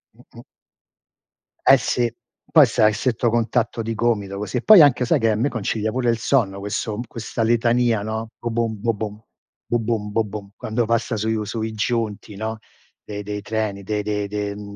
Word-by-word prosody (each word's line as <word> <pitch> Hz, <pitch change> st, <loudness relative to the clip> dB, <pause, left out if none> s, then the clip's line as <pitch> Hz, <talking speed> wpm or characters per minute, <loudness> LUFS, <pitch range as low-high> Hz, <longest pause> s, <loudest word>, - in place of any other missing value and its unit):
Mh-mh. -, -, -16 dB, 1.2 s
Eh -, -, +8 dB
sì, 120 Hz, -1 st, 0 dB, 0.4 s
poi -, -, +8 dB
stai 110 Hz, -, +3 dB
a 105 Hz, -, -2 dB
stretto 120 Hz, 0 st, 0 dB
contatto 115 Hz, 0 st, 0 dB
di 115 Hz, +1 st, -3 dB
gomito 105 Hz, -4 st, -1 dB
così; 105 Hz, +4 st, -3 dB
poi 215 Hz, -6 st, +9 dB
anche 130 Hz, -3 st, +5 dB
sai 150 Hz, +4 st, +2 dB
che 115 Hz, -2 st, +2 dB
a -, -, +1 dB
me 125 Hz, +7 st, +1 dB
concilia 110 Hz, -1 st, -2 dB
pure 125 Hz, 0 st, 0 dB
il 115 Hz, -, +2 dB
sonno 110 Hz, -5 st, +1 dB
questo 105 Hz, +2 st, -3 dB
questa 115 Hz, 0 st, -4 dB
litania, 120 Hz, -1 st, +2 dB
no: 110 Hz, +2 st, -4 dB
"bobom, 115 Hz, -2 st, -2 dB
bobom, 110 Hz, -2 st, -3 dB, 0.4 s
bobom 115 Hz, -3 st, -1 dB
bobom", 105 Hz, -2 st, -3 dB
quando 115 Hz, +2 st, -1 dB
passa 115 Hz, +1 st, 0 dB
sui 110 Hz, +1 st, 0 dB
v 110 Hz, -, -2 dB
sui 110 Hz, +1 st, -4 dB
giunti 110 Hz, -2 st, -2 dB
no, 110 Hz, +2 st, -4 dB, 0.5 s
de 105 Hz, 0 st, -6 dB
dei 105 Hz, 0 st, -5 dB
treni, 105 Hz, -1 st, -3 dB
de 105 Hz, +2 st, -2 dB
de 105 Hz, -1 st, -2 dB
de 105 Hz, 0 st, -3 dB
mhmm, 100 Hz, 0 st, -9 dB
110 Hz, 175 wpm, -22 LUFS, 105-115 Hz, 1.2 s, poi